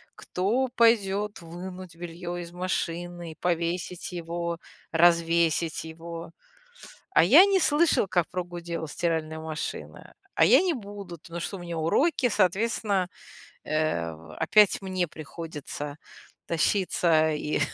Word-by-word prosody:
кто 230 +8 -1
пойдет 210 -3 +2
вынуть 180 +1 -8
белье 175 +1 -6
из 170 0 -9
машины, 175 -2 -3
повесить 175 +1 -2
его, 170 0 -3 0.3
развесить 170 -1 +3
его. 165 +1 -8 0.8
"А - - +6
я 380 - +8
не 395 -1 +3
слышал, 310 - +3
как 175 -3 +1
прогудела 175 -2 -4
стиральная 160 0 -2
машина". 160 0 -6 0.2
"А - - +5
я - - +7
не 365 -2 +1
буду, 200 - -8
потому 170 +2 -8
что 185 - -4
у - - -10
меня 170 -1 -5
уроки". 255 - +2
Соответственно, 200 -1 +1 0.6
э, 155 - 0 0.4
опять 210 -2 +4
мне 185 -2 -1
приходится 150 -2 -7 0.5
тащиться 165 -2 +2
и 150 0 -1
175 Hz, 115 wpm, -27 LUFS, 165-190 Hz, 0.8 s, я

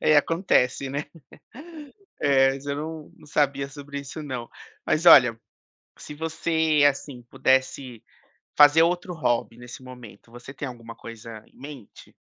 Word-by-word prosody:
É 155 - +4
acontece 145 -5 +1
né. 140 +2 -4 1.1
É 135 -1 +3
mas 135 +1 -10
eu 140 0 -3
não 155 0 -7
não - - -18
sabia 140 -2 0
sobre 140 0 -8
isso 140 +3 -9
não. 130 -5 -6 0.4
Mas 160 +3 0
olha, 120 -8 +8 0.6
se - - -10
você, 160 -1 0
assim, 135 -2 -6
pudesse 130 -2 0 0.6
fazer 145 +2 +7
outro 180 +1 -1
hobby 120 -5 -1
nesse 120 +1 -11
momento, 125 -4 -13
você 120 +3 -11
tem 140 - -6
alguma 115 -2 -10
coisa 115 -1 -11
em - - -26
mente? 140 -6 -12
140 Hz, 140 wpm, -24 LUFS, 125-150 Hz, 1.1 s, olha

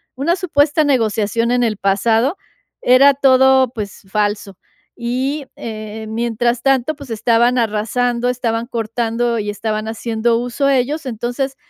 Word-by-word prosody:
una 300 +7 0
supuesta 310 -4 +1
negociación 230 -3 +1
en 245 0 +2
el 220 -3 0
pasado. 225 - +1 0.5
Era 265 +3 +6
todo, 265 -1 +4
pues, 205 -3 -6
falso, 205 -2 -2 0.4
y, 260 +4 -2
eh, 215 -1 -7
mientras 235 +1 -1
tanto, 270 +2 +1
pues, 280 -3 -12
estaban 235 +2 +2
arrasando, 235 +2 0
estaban 235 -2 -2
cortando 230 0 -2
y 210 -1 -3
estaban 215 +1 -3
haciendo 230 +1 -1
uso 245 +3 -1
ellos. 275 +4 0
Entonces, 250 +3 -3
240 Hz, 130 wpm, -18 LUFS, 220-265 Hz, 0.5 s, Era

